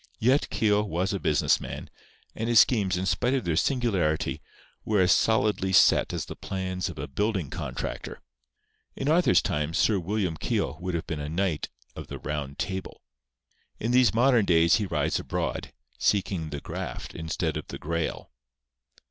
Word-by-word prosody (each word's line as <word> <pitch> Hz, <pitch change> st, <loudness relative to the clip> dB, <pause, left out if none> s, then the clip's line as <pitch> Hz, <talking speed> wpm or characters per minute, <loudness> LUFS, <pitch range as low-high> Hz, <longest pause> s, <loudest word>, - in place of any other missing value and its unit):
Yet 130 Hz, +6 st, +2 dB
Keogh 105 Hz, -2 st, +2 dB
was 95 Hz, 0 st, -1 dB
a 100 Hz, -, -1 dB
business 75 Hz, -, +2 dB
man; -, -, -6 dB, 0.5 s
and 115 Hz, +1 st, -3 dB
his 115 Hz, -2 st, +8 dB
schemes, 100 Hz, -7 st, +1 dB
in 95 Hz, -, -2 dB
spite 125 Hz, +7 st, +1 dB
of 130 Hz, -, -2 dB
their 85 Hz, -2 st, 0 dB
singularity, 95 Hz, -, 0 dB, 0.4 s
were 105 Hz, -2 st, +1 dB
as 90 Hz, -1 st, +4 dB
solidly 105 Hz, -3 st, +2 dB
set 95 Hz, -, +5 dB
as -, -, -3 dB
the -, -, -8 dB
plans 95 Hz, -1 st, -3 dB
of -, -, -9 dB
a -, -, -4 dB
building 95 Hz, 0 st, -1 dB
contractor. -, -, -5 dB, 0.8 s
In 135 Hz, -, -3 dB
Arthur's 155 Hz, -, +4 dB
time 75 Hz, +2 st, -1 dB
Sir 105 Hz, +1 st, +3 dB
William 95 Hz, -2 st, -2 dB
Keogh 80 Hz, -, -2 dB
would 90 Hz, 0 st, -3 dB
have 85 Hz, -, -3 dB
been 80 Hz, -2 st, -4 dB
a 75 Hz, 0 st, -4 dB
Knight 85 Hz, -1 st, -1 dB, 0.3 s
of -, -, -8 dB
the -, -, -6 dB
Round 70 Hz, -2 st, -4 dB
Table. 95 Hz, 0 st, -5 dB, 0.8 s
In 115 Hz, -, -1 dB
these 125 Hz, -4 st, +5 dB
modern 120 Hz, -1 st, +4 dB
days 85 Hz, -1 st, +4 dB
he 105 Hz, -2 st, -2 dB
rides -, -, 0 dB
abroad, -, -, -3 dB, 0.3 s
seeking 95 Hz, -5 st, 0 dB
the 70 Hz, -1 st, -5 dB
Graft -, -, -6 dB
instead 80 Hz, -1 st, -2 dB
of -, -, -5 dB
the -, -, -6 dB
Grail. 85 Hz, +1 st, -3 dB
95 Hz, 170 wpm, -27 LUFS, 80-110 Hz, 0.8 s, his